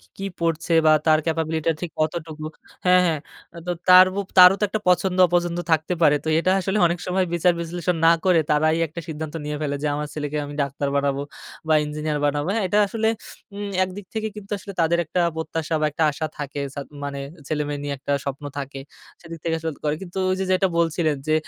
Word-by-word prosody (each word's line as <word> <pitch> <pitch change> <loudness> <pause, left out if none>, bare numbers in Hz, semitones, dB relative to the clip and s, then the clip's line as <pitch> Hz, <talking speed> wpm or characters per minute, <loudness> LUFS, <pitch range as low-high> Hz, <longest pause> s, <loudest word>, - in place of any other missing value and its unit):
কী - - -25
কী 195 - -3
পড়ছে 165 +1 -1
বা 155 - +7
তার 155 -1 +5
ক্যাপাবিলিটি 160 -1 -1
টা - - +4
ঠিক 170 - -3
কতটুকু 155 -1 -3 0.4
হ্যাঁ, 180 0 +6
হ্যাঁ, 160 -3 +1 0.4
আ - - -7
তো 180 - -1 0.2
তারও 185 +2 +7 0.2
তারও 180 +1 +10
তো - - +3
একটা 215 +1 -2
পছন্দ-অপছন্দ 175 -2 +3
থাকতে 160 +3 +2
পারে। 150 -2 +6
তো - - -3
এটা 185 - +1
আসলে 190 +3 -1
অনেক 170 0 -1
সময় 185 +1 +1
বিচার 175 +1 +3
বিশ্লেষণ 170 +1 -2
না 165 - +8
করে, 180 -3 +4
তারাই 155 +2 +3
একটা 165 +2 -8
সিদ্ধান্ত 155 0 -5
নিয়ে 150 0 -3
ফেলে 145 -1 -1
যে - - 0
আমার 150 +1 -3
ছেলেকে 150 0 -3
আমি 145 0 -8
ডাক্তার 140 +1 -2
বানাবো 140 0 0 0.5
বা 155 - +5
ইঞ্জিনিয়ার 150 0 -3
বানাবো। 145 +3 -1
হ্যাঁ, 225 - 0
এটা 205 - +2
আসলে 220 +2 0 0.5
উম 205 0 -4 0.2
একদিক 185 +1 -8
থেকে 220 0 -1
কিন্তু 205 -1 -10
আসলে 200 +1 -9
তাদের 170 +1 +2
একটা 180 +3 -1 0.2
প্রত্যাশা 160 0 -3
বা 155 - +2
একটা 160 - -2
আশা 155 +2 -3
থাকে 145 0 -4
সাদ 140 -1 -6 0.2
মানে 140 -1 -4 0.3
ছেলে-মেয়ে 145 -1 -2
নিয়ে 145 -1 -3
একটা 140 +1 -3
স্বপ্ন 140 +1 -5
থাকে। 135 -1 -6 0.4
সেদিক 165 -1 -9
থেকে 165 -1 0
আসলে 160 0 -3
করে। 150 - +1
কিন্তু 175 +1 -7
ওই 185 - +1
যে - - 0
যেটা 185 +1 +3
বলছিলেন 165 -2 +1
যে 155 - +3
160 Hz, 210 wpm, -23 LUFS, 150-180 Hz, 0.5 s, তারও